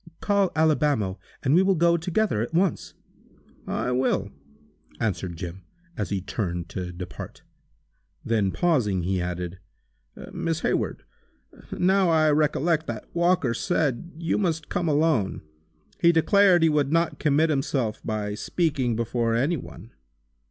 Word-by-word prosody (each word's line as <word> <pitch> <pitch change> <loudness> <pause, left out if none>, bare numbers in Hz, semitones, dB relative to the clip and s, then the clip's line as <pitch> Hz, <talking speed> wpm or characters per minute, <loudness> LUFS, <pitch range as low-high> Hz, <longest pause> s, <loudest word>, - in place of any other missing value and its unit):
Call 200 -3 +1
Alibamo, 145 -11 +1 0.2
and 135 - +2
we 175 - +6
will 190 0 +3
go 170 +1 +3
together, 175 - 0
at 120 +8 -4
once!" 180 -2 0 0.7
"I - - -1
will," 125 +1 0 0.7
answered 90 -5 -2
Jim, 90 +1 -7 0.3
as 105 - -3
he 100 -2 -2
turned 90 -3 -4
to 90 +1 -5
depart. 90 +1 -8 0.8
Then 110 -4 +1
pausing, 115 - +1
he 95 +1 0
added: 90 0 -4 0.7
"Miss 165 -1 -2
Hayward, - - -1 0.7
now 190 0 +2
I 155 -2 +4
recollect 155 +2 +1
that 115 -2 -5
Walker 170 -7 +2
said 160 +2 -1
you 165 +2 -1
must 165 -6 -1
come 175 -2 -1
alone. 150 - +1 0.6
He 170 - +5
declared 180 +1 +4
he 165 - +5
would 150 -2 +1
not 165 -2 +1
commit 155 +2 +2
himself 135 -5 -1
by 105 -2 -3
speaking 135 - -1
before 115 0 0
any 140 +9 +1
one." 115 - -11
145 Hz, 135 wpm, -25 LUFS, 105-170 Hz, 0.8 s, we